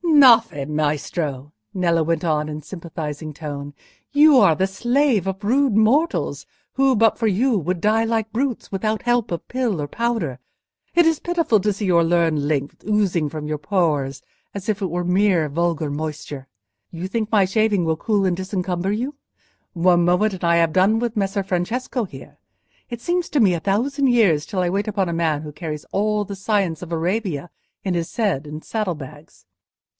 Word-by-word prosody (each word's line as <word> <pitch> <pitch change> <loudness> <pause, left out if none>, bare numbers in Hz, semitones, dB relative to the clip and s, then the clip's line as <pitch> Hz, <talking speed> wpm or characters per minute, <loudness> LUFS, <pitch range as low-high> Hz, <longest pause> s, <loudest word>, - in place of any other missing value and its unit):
"Gnaffè, 235 - +5
Maestro," 150 -1 -2 0.2
Nello 170 -3 +1
went 165 +1 -1
on, 150 -2 0
in 150 - -5
a - - -8
sympathising 155 -3 -6
tone, 145 -1 -7 0.4
"you 290 0 +6
are 195 -9 +5
the 190 +5 +1
slave 240 - +1
of 195 +2 -4
rude 255 +2 +2
mortals, 260 +10 +2 0.3
who, 270 -1 +3
but 225 0 +3
for 230 - -1
you, 225 +4 +2
would 175 0 -2
die 220 +2 +3
like 225 -1 -1
brutes, 250 +1 -2
without 215 +3 -2
help 240 -3 +1
of 170 - -4
pill 240 -10 -1
or 145 - -3
powder. 225 - -2 0.6
It 345 -1 +5
is 325 -2 +2
pitiful 335 -11 +1
to 210 +1 +1
see 200 +2 -4
your 170 -3 +4
learned 165 -3 +1
lymph 145 -2 -1
oozing 195 -7 +1
from 150 0 -6
your 150 0 -2
pores 145 -5 -1 0.3
as 200 +1 -6
if 210 -1 -1
it 190 -4 -2
were 175 +1 -1
mere 180 -3 +2
vulgar 165 0 -1
moisture. 145 -2 -5 0.4
You 170 +2 -5
think 220 +1 -3
my 205 -3 +4
shaving 205 -1 +1
will 160 -1 0
cool 205 +1 0
and 180 -2 0
disencumber 185 -1 -2
you? 250 +7 -2 0.6
One 175 -1 +3
moment 180 +4 +2
and 185 - -8
I 170 0 +3
have 165 -2 +2
done 200 +4 +3
with 235 -1 -2
Messer 195 0 0
Francesco 220 +7 -2
here. - - -12 0.5
It 240 -2 -6
seems 350 +3 -1
to 295 - +1
me 200 -6 +4
a 170 - -1
thousand 265 - 0
years 205 - +3
till 195 - -4
I 180 - +1
wait 200 +4 -1
upon 195 -4 -1
a - - -2
man 160 -3 0
who 150 - -7
carries 150 -1 -6
all 210 +1 0
the 200 0 -6
science 195 -5 -1
of 175 -1 -8
Arabia 175 -1 -2 0.3
in 190 - -1
his 170 -1 -3
head 195 - 0
and 150 +1 -8
saddle 210 -6 -2
bags. 150 +1 -12
185 Hz, 190 wpm, -21 LUFS, 160-220 Hz, 0.6 s, you